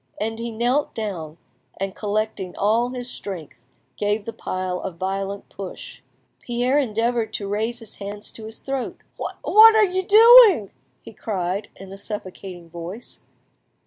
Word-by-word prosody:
And 225 Hz, +1 st, -2 dB
he 235 Hz, 0 st, -3 dB
knelt 245 Hz, +6 st, 0 dB
down, 175 Hz, -8 st, -5 dB, 0.4 s
and 195 Hz, 0 st, -3 dB
collecting 210 Hz, -3 st, -2 dB
all 225 Hz, +4 st, +2 dB
his 250 Hz, -1 st, -6 dB
strength, 155 Hz, -, -8 dB, 0.3 s
gave 205 Hz, 0 st, 0 dB
the 230 Hz, -, -5 dB
pile 185 Hz, -1 st, -3 dB
a 190 Hz, -, -4 dB
violent 195 Hz, +3 st, -4 dB
push. 195 Hz, -2 st, -9 dB, 0.4 s
Pierre 245 Hz, +3 st, +1 dB
endeavoured 230 Hz, -2 st, 0 dB
to 200 Hz, -, -4 dB
raise 220 Hz, +4 st, -1 dB
his 225 Hz, -3 st, -12 dB
hands 205 Hz, +1 st, -7 dB
to 220 Hz, -, -10 dB
his 220 Hz, 0 st, -10 dB
throat. 270 Hz, -2 st, -4 dB, 0.2 s
"What 440 Hz, +1 st, +5 dB
are 435 Hz, -1 st, +6 dB
you 375 Hz, 0 st, -1 dB
doing?" 430 Hz, -, +8 dB, 0.3 s
he -, -, -11 dB
cried 195 Hz, -1 st, -3 dB
in 195 Hz, 0 st, -11 dB
a 195 Hz, -, -9 dB
suffocating 190 Hz, -4 st, -7 dB
voice. 175 Hz, +7 st, -9 dB
215 Hz, 145 wpm, -23 LUFS, 195-240 Hz, 0.4 s, doing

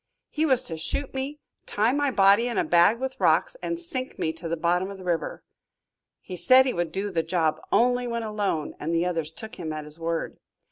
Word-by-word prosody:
He 315 Hz, +1 st, +1 dB
was 260 Hz, -3 st, +3 dB
to 165 Hz, -, -5 dB
shoot 260 Hz, -, -2 dB
me, 270 Hz, +3 st, -4 dB, 0.3 s
tie 215 Hz, +3 st, +2 dB
my 285 Hz, +1 st, +1 dB
body 200 Hz, 0 st, +5 dB
in 240 Hz, -, -3 dB
a -, -, +3 dB
bag 175 Hz, +6 st, +4 dB
with 265 Hz, 0 st, -4 dB
rocks, -, -, +3 dB
and 335 Hz, 0 st, -3 dB
sink 270 Hz, -7 st, -4 dB
me 160 Hz, -, -1 dB
to 165 Hz, +1 st, -7 dB
the 170 Hz, -, -1 dB
bottom 175 Hz, +3 st, +1 dB
of 200 Hz, -, -8 dB
the 190 Hz, -, -11 dB
river. 175 Hz, -2 st, -2 dB, 0.8 s
He 185 Hz, -, -7 dB
said 255 Hz, +9 st, +6 dB
he 255 Hz, -, 0 dB
would 170 Hz, -2 st, -2 dB
do 200 Hz, +3 st, -3 dB
the 170 Hz, -3 st, +1 dB
job 160 Hz, -2 st, 0 dB
only 245 Hz, +1 st, +3 dB
when 235 Hz, -1 st, -2 dB
alone 205 Hz, -8 st, -2 dB
and 165 Hz, +2 st, -2 dB
the 165 Hz, +1 st, +2 dB
others 165 Hz, -4 st, -2 dB
took 220 Hz, +7 st, -10 dB
him 160 Hz, -3 st, -4 dB
at 155 Hz, -1 st, -5 dB
his 150 Hz, +2 st, -6 dB
word. 165 Hz, 0 st, -3 dB
195 Hz, 225 wpm, -26 LUFS, 165-250 Hz, 0.8 s, said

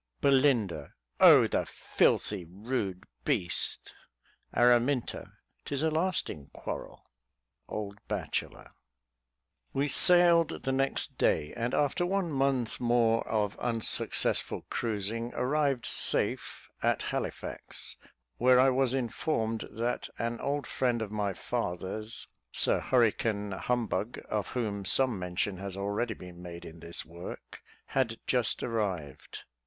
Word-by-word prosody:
Belin. 135 Hz, -5 st, +4 dB, 0.5 s
O, -, -, +9 dB
the -, -, 0 dB
filthy, 100 Hz, -4 st, +1 dB
rude 95 Hz, +1 st, -3 dB, 0.2 s
beast. 85 Hz, -1 st, -1 dB, 0.6 s
Aram. 120 Hz, +1 st, +5 dB, 0.2 s
'Tis 140 Hz, +1 st, -7 dB
a 160 Hz, -, +2 dB
lasting 160 Hz, -, -1 dB
quarrel. -, -, -7 dB, 0.6 s
Old 105 Hz, -1 st, -5 dB
Bachelor. -, -, -4 dB, 1.0 s
We 140 Hz, +2 st, +1 dB
sailed 170 Hz, +2 st, +4 dB
the 135 Hz, -, 0 dB
next 135 Hz, +1 st, -1 dB
day, 75 Hz, -, +2 dB
and 120 Hz, +1 st, -1 dB
after 145 Hz, +4 st, +1 dB
one 185 Hz, -1 st, 0 dB
month 135 Hz, -4 st, 0 dB
more 120 Hz, -2 st, +2 dB
of 105 Hz, -2 st, -1 dB
unsuccessful 115 Hz, -2 st, 0 dB
cruising, 115 Hz, +1 st, -2 dB
arrived 140 Hz, -2 st, +1 dB
safe -, -, +2 dB
at -, -, +1 dB
Halifax, -, -, -5 dB, 0.4 s
where 125 Hz, +1 st, +5 dB
I 130 Hz, +1 st, +6 dB
was 130 Hz, 0 st, +2 dB
informed 115 Hz, -2 st, -1 dB
that 120 Hz, +2 st, -2 dB
an 115 Hz, 0 st, -2 dB
old 140 Hz, -1 st, -1 dB
friend 120 Hz, -3 st, 0 dB
of 105 Hz, -, -7 dB
my 105 Hz, -2 st, -1 dB
father's, 110 Hz, +1 st, -4 dB, 0.3 s
Sir -, -, +3 dB
Hurricane 110 Hz, -4 st, +1 dB
Humbug, 115 Hz, 0 st, -1 dB
of 105 Hz, -2 st, -1 dB
whom 105 Hz, -4 st, -2 dB
some 125 Hz, +2 st, +3 dB
mention 90 Hz, +2 st, -2 dB
has 95 Hz, 0 st, -6 dB
already 100 Hz, +3 st, -1 dB
been 90 Hz, -1 st, -11 dB
made 85 Hz, -1 st, -8 dB
in 80 Hz, +1 st, -10 dB
this 85 Hz, +1 st, -5 dB
work, 85 Hz, +2 st, -9 dB, 0.2 s
had 120 Hz, -4 st, -1 dB
just 125 Hz, -3 st, +1 dB
arrived. 95 Hz, -, -3 dB
115 Hz, 115 wpm, -30 LUFS, 100-130 Hz, 1.0 s, O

